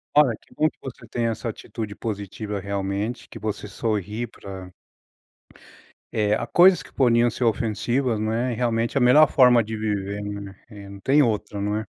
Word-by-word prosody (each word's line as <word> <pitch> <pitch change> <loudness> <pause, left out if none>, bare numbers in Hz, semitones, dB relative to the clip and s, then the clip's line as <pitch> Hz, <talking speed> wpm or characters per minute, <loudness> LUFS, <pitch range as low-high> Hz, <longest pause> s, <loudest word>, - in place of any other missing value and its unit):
Olha, 135 -7 +5
que - - -22
bom 155 - +3
que - - -31
você 120 -3 -9
tenha 115 0 -1
essa 115 +1 -4
atitude 105 -1 -6
positiva 105 -1 -5
realmente, 100 +3 -3
que - - -10
você 105 0 -4
sorri 105 +1 -2
para 95 -3 -10 1.4
eh, 105 -1 +1
a - - -3
coisas 180 0 +6
que - - -15
poderiam 120 -2 +3
ser 120 - -4
ofensivas, 115 +2 0
né, 115 +4 -1
e - - -4
realmente 115 +1 0
é - - +4
a - - +3
melhor 150 +5 +7
forma 125 -3 +5
de 110 +1 -5
viver, 105 -1 -2
né, 100 -1 -6 0.2
e 100 -1 -10
não 100 0 -10
tem 140 +7 +4
outra, 105 -4 -1
não 105 +1 -1
é. 110 - -4
110 Hz, 185 wpm, -24 LUFS, 100-120 Hz, 1.4 s, melhor